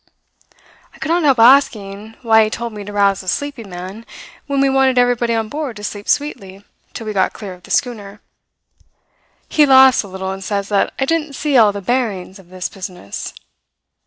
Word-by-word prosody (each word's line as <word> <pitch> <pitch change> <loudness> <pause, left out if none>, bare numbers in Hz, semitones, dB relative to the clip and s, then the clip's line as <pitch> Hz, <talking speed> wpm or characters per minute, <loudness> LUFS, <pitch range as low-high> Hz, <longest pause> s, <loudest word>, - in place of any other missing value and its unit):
"I - - -16
could 310 - -5
not 345 +1 +2
help 280 -5 +3
asking 220 -4 +3
why 220 -1 +5
he - - -3
told 235 +1 -5
me 210 -1 -7
to 205 - -8
rouse 200 -1 +2
a 185 - -15
sleeping 265 0 -3
man, 185 +5 -8 0.4
when 280 -1 -1
we 275 - +4
wanted 265 -1 +2
everybody 245 -1 +2
on 225 -1 -1
board 285 -1 -5
to 205 - -10
sleep 205 0 -6
sweetly 200 -9 -2 0.3
till 225 - -6
we 215 - -4
got 190 -2 +1
clear 200 -4 -8
of 180 - -15
the - - -17
schooner. 210 -6 -2 1.3
He 305 - +3
laughs 265 -1 +7
a 205 - -10
little 190 0 -5
and 195 0 -6
says 200 0 -3
that 200 -2 +1
I 270 - 0
didn't 315 -1 -1
see 285 +1 -1
all 220 -4 +6
the 200 0 -6
bearings 200 -4 -2
of 180 -2 -18
this 185 0 -4
business. 180 - -8
220 Hz, 195 wpm, -18 LUFS, 195-265 Hz, 1.3 s, laughs